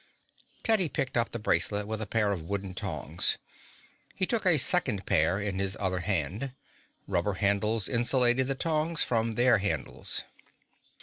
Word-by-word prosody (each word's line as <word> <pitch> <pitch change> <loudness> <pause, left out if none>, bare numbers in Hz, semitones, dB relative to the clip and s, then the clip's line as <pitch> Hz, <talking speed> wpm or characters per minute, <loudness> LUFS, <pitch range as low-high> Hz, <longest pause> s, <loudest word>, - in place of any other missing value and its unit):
Teddy 215 -8 +3
picked 130 -2 -3
up 120 -1 +1
the - - -5
bracelet 105 0 +1
with 110 +1 -4
a 110 - -3
pair 105 0 +1
of 95 -5 -3
wooden 95 +2 -5
tongs. 80 -2 -1 0.8
He 185 - 0
took 220 -1 -1
a 170 -4 +6
second 130 - +2
pair 80 +5 +2
in 100 -2 -3
his 95 +1 0
other 95 -3 -1
hand. 100 - -2 0.5
Rubber 95 +1 0
handles 100 +2 +1
insulated 125 +1 +3
the 135 - -1
tongs 160 +2 0
from 115 -1 -1
their 120 -1 +4
handles. 100 +1 -2
110 Hz, 150 wpm, -28 LUFS, 95-130 Hz, 0.8 s, a